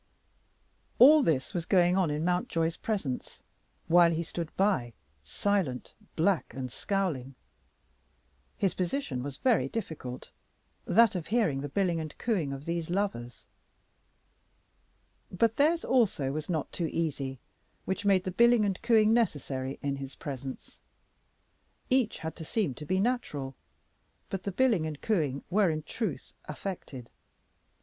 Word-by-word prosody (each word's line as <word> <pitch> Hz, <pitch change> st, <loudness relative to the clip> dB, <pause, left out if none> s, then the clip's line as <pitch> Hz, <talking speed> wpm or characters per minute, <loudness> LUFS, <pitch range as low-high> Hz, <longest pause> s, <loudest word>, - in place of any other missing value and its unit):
All 295 Hz, +5 st, +8 dB
this 150 Hz, -, 0 dB
was 170 Hz, -2 st, -3 dB
going 180 Hz, -2 st, +4 dB
on 185 Hz, -4 st, +2 dB
in 150 Hz, +2 st, -1 dB
Mountjoy's 170 Hz, -2 st, 0 dB
presence, 190 Hz, -, -4 dB, 0.4 s
while 170 Hz, +1 st, +6 dB
he 165 Hz, 0 st, -1 dB
stood 165 Hz, 0 st, -5 dB
by, 185 Hz, -, +1 dB, 0.3 s
silent, 145 Hz, -, -1 dB, 0.2 s
black, 165 Hz, -, +1 dB
and 130 Hz, -2 st, -5 dB
scowling. 155 Hz, -11 st, -2 dB, 1.2 s
His 195 Hz, -, +1 dB
position 180 Hz, -, -2 dB
was 135 Hz, 0 st, -6 dB
very 250 Hz, -4 st, +2 dB
difficult, 155 Hz, -, -6 dB, 0.5 s
that 230 Hz, 0 st, +5 dB
of 175 Hz, -4 st, -4 dB
hearing 210 Hz, -, +1 dB
the 145 Hz, -, -4 dB
billing 175 Hz, 0 st, 0 dB
and 155 Hz, -2 st, -6 dB
cooing 185 Hz, -, -1 dB
of 140 Hz, +1 st, -7 dB
these 170 Hz, -1 st, -2 dB
lovers. 175 Hz, -11 st, -3 dB, 1.9 s
But 225 Hz, +4 st, +1 dB
theirs 320 Hz, +4 st, +3 dB
also 205 Hz, -, +2 dB
was 155 Hz, +3 st, -4 dB
not 160 Hz, -4 st, -2 dB
too 170 Hz, -, -2 dB
easy, 140 Hz, -5 st, -2 dB, 0.5 s
which 190 Hz, +2 st, -2 dB
made 195 Hz, -2 st, +3 dB
the 185 Hz, -, -3 dB
billing 235 Hz, +2 st, +5 dB
and 195 Hz, -2 st, -2 dB
cooing 225 Hz, -2 st, +4 dB
necessary 140 Hz, -, -1 dB
in 140 Hz, -1 st, -1 dB
his 135 Hz, -1 st, -7 dB
presence. 135 Hz, -2 st, -7 dB, 1.1 s
Each 255 Hz, -4 st, +2 dB
had 160 Hz, 0 st, -6 dB
to 165 Hz, -, -6 dB
seem 185 Hz, -, -1 dB
to 150 Hz, +4 st, -10 dB
be 185 Hz, +3 st, +1 dB
natural, 170 Hz, -, -1 dB, 0.8 s
but 195 Hz, -, -2 dB
the 200 Hz, -, -1 dB
billing 210 Hz, -7 st, +2 dB
and 150 Hz, -2 st, -6 dB
cooing 150 Hz, -11 st, 0 dB
were 200 Hz, -1 st, +4 dB
in 155 Hz, -1 st, -2 dB
truth 165 Hz, -, -4 dB
affected. 145 Hz, -6 st, -7 dB
170 Hz, 140 wpm, -29 LUFS, 140-205 Hz, 1.9 s, All